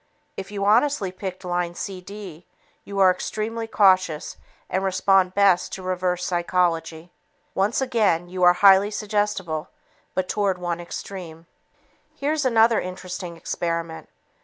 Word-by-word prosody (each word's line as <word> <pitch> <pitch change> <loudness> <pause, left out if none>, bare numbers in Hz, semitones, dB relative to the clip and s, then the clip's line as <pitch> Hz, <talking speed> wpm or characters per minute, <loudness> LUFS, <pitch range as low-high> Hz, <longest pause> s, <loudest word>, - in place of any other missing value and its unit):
If 195 - -7
you 200 -1 -3
honestly 225 -1 +3
picked 185 0 -7
line 175 -1 -2
CD, 185 -2 -8 0.4
you 200 - -7
are 190 -1 +6
extremely 220 +4 -4
cautious 185 -7 +2 0.3
and 190 - -1
respond 190 -1 +2
best 195 -3 +3
to 190 - -6
"reverse 180 -1 -1
psychology." 175 -2 -1 0.4
Once 205 +7 +1
again 215 -10 +1
you 180 +1 -6
are 175 0 +7
highly 195 +2 +6
suggestible, 205 -6 -2 0.5
but 185 -1 0
toward 200 -2 0
one 175 -1 -3
extreme. 170 -2 -8 0.7
Here's 295 +1 -1
another 230 -2 +4
interesting 180 -1 -7
experiment. 165 -1 -4
185 Hz, 125 wpm, -23 LUFS, 175-205 Hz, 0.7 s, are